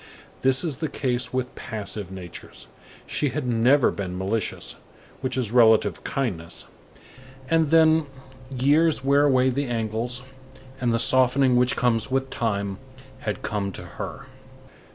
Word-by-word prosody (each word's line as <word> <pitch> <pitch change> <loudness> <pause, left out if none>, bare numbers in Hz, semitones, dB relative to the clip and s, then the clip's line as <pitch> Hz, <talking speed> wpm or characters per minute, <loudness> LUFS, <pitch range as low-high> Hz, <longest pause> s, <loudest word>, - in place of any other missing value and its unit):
This 130 +3 +3
is 155 -6 -2
the 160 - -2
case 125 -3 -1
with 130 -1 -2
passive 105 -3 -6
natures. 90 -3 -10 0.4
She 145 - 0
had 125 - -3
never 125 +3 +4
been 90 -3 -5
malicious, 100 +3 -3 0.4
which 130 -1 -2
is 120 -5 -1
relative 115 -3 +4
kindness; 90 -11 -3 0.9
and 160 -2 +3
then, 160 -1 +5 0.4
years 145 +3 +2
wear 140 +1 +4
away 130 -2 +3
the 140 +2 -1
angles, 115 +2 -2 0.6
and 120 -2 +1
the 115 - +2
softening 130 +1 +3
which 125 0 +3
comes 115 -2 +1
with 135 0 -1
time 100 -3 -2 0.4
had 105 -5 -4
come 100 -2 -2
to - - -8
her. - - -7
125 Hz, 135 wpm, -24 LUFS, 110-135 Hz, 0.9 s, then